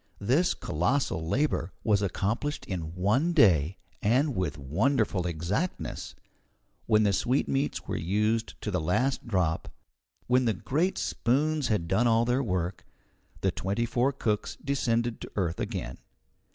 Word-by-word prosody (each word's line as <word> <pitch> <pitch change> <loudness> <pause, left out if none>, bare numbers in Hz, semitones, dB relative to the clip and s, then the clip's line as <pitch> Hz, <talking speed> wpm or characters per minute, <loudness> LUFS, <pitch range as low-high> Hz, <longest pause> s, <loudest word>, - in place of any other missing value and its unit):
This 135 - +2
colossal 90 - -1
labour 125 - 0
was 105 -2 +3
accomplished 110 - -1
in 85 -3 -5
one 115 - +2
day, 90 - +4 0.2
and 130 +6 +2
with 80 -6 -1
wonderful 95 - +1
exactness. 90 - -3 0.7
When 110 0 +4
the 100 -1 +3
sweetmeats 135 +5 0
were - - -2
used 105 +6 0
to 105 - -3
the 90 -3 0
last 125 +12 0
drop, 90 -7 0 0.5
when 125 +1 +3
the 110 -3 +2
great 160 - 0
spoons 145 +3 +1
had 105 -7 0
done 110 +7 +2
all 115 0 +3
their 125 +3 +2
work, 90 -5 -2 0.6
the - - +2
twenty 100 +5 -1
four 120 +3 +1
cooks 110 -6 -2
descended 120 -4 0
to - - -8
earth 90 -4 -1
again. - - -4
110 Hz, 140 wpm, -28 LUFS, 90-130 Hz, 0.7 s, day